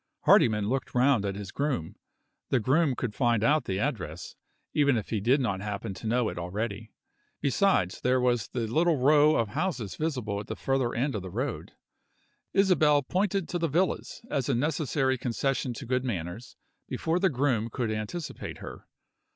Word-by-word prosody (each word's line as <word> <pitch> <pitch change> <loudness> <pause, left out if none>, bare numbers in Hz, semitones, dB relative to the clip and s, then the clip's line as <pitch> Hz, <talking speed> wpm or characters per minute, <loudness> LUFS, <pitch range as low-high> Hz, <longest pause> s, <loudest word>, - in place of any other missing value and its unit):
Hardyman 105 -3 +4
looked 130 +3 -2
round 125 -4 +3
at 100 -1 -2
his 100 -1 -7
groom. 140 - -2 0.5
The 130 - +3
groom 135 +4 +2
could 120 -4 -3
find 120 -2 +1
out 150 +5 +3
the 95 - -2
address, 95 - -3 0.4
even 140 -4 +3
if 110 - -4
he 110 - 0
did 125 +7 +3
not 105 -7 -1
happen 100 -1 -4
to 100 +4 -7
know 120 +1 +2
it - - -6
already. 105 +4 -4 0.5
Besides, 140 - +1
there 130 +1 +2
was 120 -3 +1
the 120 -2 -3
little 160 +8 +2
row 150 +3 +5
of 115 -2 +1
houses 120 - -2
visible 125 -10 -2
at 105 - -8
the - - -4
further 135 -3 0
end 135 +4 0
of 105 - -3
the 95 - -7
road. 120 +7 -4 0.8
Isabel 155 -7 +4
pointed 195 +4 0
to 175 - -2
the 165 - +1
villas, 175 - -1
as 140 - -1
a 135 - +2
necessary 135 -1 0
concession 130 +1 -1
to 135 - -7
good 125 +1 0
manners, 100 -1 -5 0.3
before 165 +2 -1
the 190 0 +3
groom 125 -5 0
could 115 -2 -2
anticipate 110 +10 -5
her. - - -10
125 Hz, 175 wpm, -28 LUFS, 110-145 Hz, 0.8 s, row